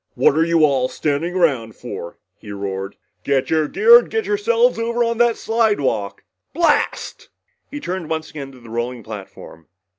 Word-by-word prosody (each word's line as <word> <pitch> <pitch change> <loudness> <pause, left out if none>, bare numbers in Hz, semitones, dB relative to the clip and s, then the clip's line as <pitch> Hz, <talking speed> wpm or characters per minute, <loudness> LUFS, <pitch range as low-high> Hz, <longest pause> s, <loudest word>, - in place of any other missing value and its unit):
"What - - +3
are 160 - +3
you 165 -1 +4
all 135 -3 +1
standing 155 +4 -2
around 130 - +1
for?" 105 -8 -8 0.2
he 105 - -10
roared. 100 -1 -5 0.3
"Get 135 -2 0
your 155 -1 +2
gear 470 - +7
and - - -8
yourselves 450 - +1
over 235 +1 0
on 230 0 -1
that 240 -1 +3
slidewalk! 205 - 0 0.3
Blast!" 330 -3 0 0.4
He 290 - -6
turned 180 - -5
once 160 -1 -3
again 140 -3 -8
to 130 - -15
the 115 -2 -14
rolling 120 0 -4
platform. 95 -6 -10
155 Hz, 160 wpm, -20 LUFS, -, 0.4 s, gear